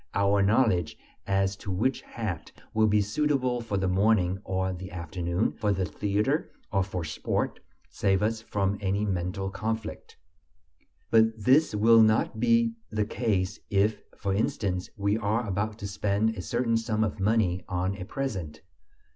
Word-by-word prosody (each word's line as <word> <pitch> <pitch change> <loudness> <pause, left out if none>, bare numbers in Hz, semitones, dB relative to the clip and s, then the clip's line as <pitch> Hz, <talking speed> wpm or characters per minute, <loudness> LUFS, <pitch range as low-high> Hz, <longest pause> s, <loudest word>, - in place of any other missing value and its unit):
Our 100 0 +3
knowledge 100 -5 +2 0.3
as 95 0 +1
to 100 - -8
which 115 +8 0
hat 95 -9 -5 0.2
will 110 0 +4
be 105 0 +3
suitable 125 +3 0
for 115 -3 -2
the 95 -1 0
morning 95 -1 +2
or 95 0 -1
the 95 +1 -7
afternoon, 85 +2 -2
for 105 -2 -1
the 95 -1 0
theater 105 - 0 0.2
or 100 -3 +2
for 95 -2 -3
sport, 80 - -2 0.3
saves 95 0 +1
us 110 +1 0
from 100 -2 -1
any 100 +2 0
mental 95 0 -2
conflict. 110 +1 -4 0.9
But 110 0 +4
this 135 +2 +4
will 115 +2 +6
not 110 0 +3
be 115 -1 +3 0.2
the 105 -1 0
case 105 -4 -1
if, 105 +2 +2 0.2
for 100 -2 -1
instance, 95 -3 -1
we 100 +2 +1
are 110 +2 0
about 105 +2 -2
to 100 - -5
spend 100 +2 0
a 110 - -6
certain 115 +6 0
sum 110 -1 0
of 105 -2 -2
money 95 -3 +1
on 95 +1 -1
a 95 - -6
present. 95 - -4
100 Hz, 155 wpm, -27 LUFS, 95-110 Hz, 0.9 s, will